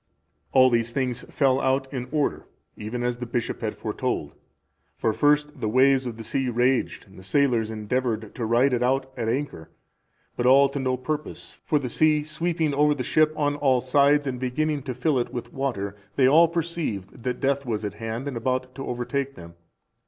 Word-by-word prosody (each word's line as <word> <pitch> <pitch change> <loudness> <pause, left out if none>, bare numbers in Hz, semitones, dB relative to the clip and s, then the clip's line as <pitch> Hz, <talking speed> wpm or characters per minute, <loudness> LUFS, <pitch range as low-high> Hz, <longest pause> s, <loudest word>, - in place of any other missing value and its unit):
All 130 -1 +6
these 115 0 +1
things 125 -2 -2
fell 135 -2 +2
out 135 +1 +1
in 125 -2 -4
order, 150 -2 -1 0.3
even 115 +3 -5
as 120 0 -1
the 125 0 -6
bishop 120 0 -3
had - - -3
foretold. - - -3 0.6
For 110 - 0
first, 150 +2 +2
the 110 - 0
waves 130 +2 +4
of 115 -2 -6
the 115 - -7
sea 130 +3 -1
raged, 125 +2 0
and 95 - -15
the - - -13
sailors 115 +1 +1
endeavoured 110 0 -2
to 120 - -3
ride 125 +4 +3
it 120 - +1
out 130 +1 0
at 115 -3 -2
anchor, 125 - -3 0.7
but 120 - 0
all 135 +2 +6
to 140 +1 -4
no 130 -1 0
purpose; 150 +4 -5
for 150 - +1
the 140 -3 -2
sea 150 +4 +2
sweeping 160 0 -1
over 150 +1 +3
the 130 - -3
ship 155 +5 +3
on 145 -1 0
all 135 -3 +3
sides 140 +3 +3
and 130 -2 -3
beginning 145 +4 -1
to 130 -2 -5
fill 130 +2 +1
it 120 - -2
with 120 - -6
water, 115 -8 -3 0.2
they 130 - +4
all 160 +5 +6
perceived 160 - -4
that 125 -1 -2
death 140 0 +1
was 110 -2 -2
at 105 - -3
hand 115 +5 -5
and 140 - -4
about 130 +2 -2
to 135 +1 -7
overtake 135 +3 -3
them. 85 -1 -11
130 Hz, 195 wpm, -25 LUFS, 120-140 Hz, 0.7 s, All